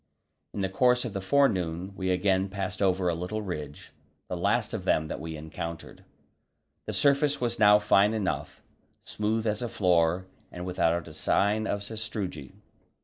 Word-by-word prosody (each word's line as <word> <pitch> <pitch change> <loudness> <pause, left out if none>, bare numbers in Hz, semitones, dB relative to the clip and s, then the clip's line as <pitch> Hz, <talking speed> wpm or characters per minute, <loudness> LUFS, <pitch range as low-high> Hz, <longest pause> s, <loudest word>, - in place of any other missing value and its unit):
In 100 - -2
the 95 - +1
course 125 +6 +2
of 115 - -5
the 100 - -3
forenoon 95 -7 +1
we 95 -1 -2
again 95 +1 +1
passed 95 -1 -4
over 95 -1 +2
a 85 - +2
little 90 +6 -4
ridge, 75 -6 -6 0.4
the 90 - -2
last 105 +6 0
of 110 -4 -3
them 80 -4 +1
that - - -4
we 80 0 -6
encountered. 80 +1 -7 0.8
The - - -3
surface 140 0 +3
was 120 -1 -2
now 105 0 +7
fine 105 +1 +3
enough, 100 -4 -3 0.4
smooth 110 +1 -2
as 105 0 0
a 120 - -2
floor 90 -2 +2 0.3
and 90 0 -7
without 85 -2 0
a 80 - -10
sign 105 +7 +1
of 100 0 -2
sastrugi. 100 - -5
95 Hz, 165 wpm, -28 LUFS, 90-110 Hz, 0.8 s, now